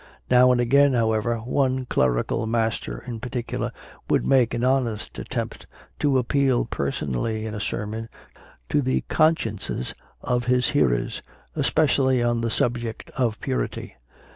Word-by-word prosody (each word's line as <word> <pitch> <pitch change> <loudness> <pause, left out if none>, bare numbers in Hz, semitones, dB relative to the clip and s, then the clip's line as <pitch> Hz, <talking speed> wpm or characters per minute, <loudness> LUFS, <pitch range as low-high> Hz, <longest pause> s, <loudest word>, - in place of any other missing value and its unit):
Now 125 0 +7
and 125 - +2
again, 140 +3 +4
however, 115 0 +1
one 130 +1 0
clerical 65 - 0
master 115 0 -1
in 120 -3 -5
particu 125 0 -4
lar - - -2 0.4
would - - +2
make 125 -4 +3
an 120 - -2
honest 125 -5 0
attempt - - -5 0.3
to 140 -3 +3
appeal 130 0 +2
person 70 0 -3
ally 110 - -1
in 110 -1 -4
a 105 - -4
sermon 110 +2 -4 0.6
to 145 - +2
the 130 -1 0
consciences 115 - +1 0.3
of 120 -1 0
his 125 0 +2
hearers, - - +1 0.3
especially 130 -5 +2
on 120 -1 +1
the 115 - 0
subject 115 -1 -2
of 115 -4 -1
purity. 130 -1 -3
120 Hz, 140 wpm, -24 LUFS, 110-130 Hz, 0.6 s, Now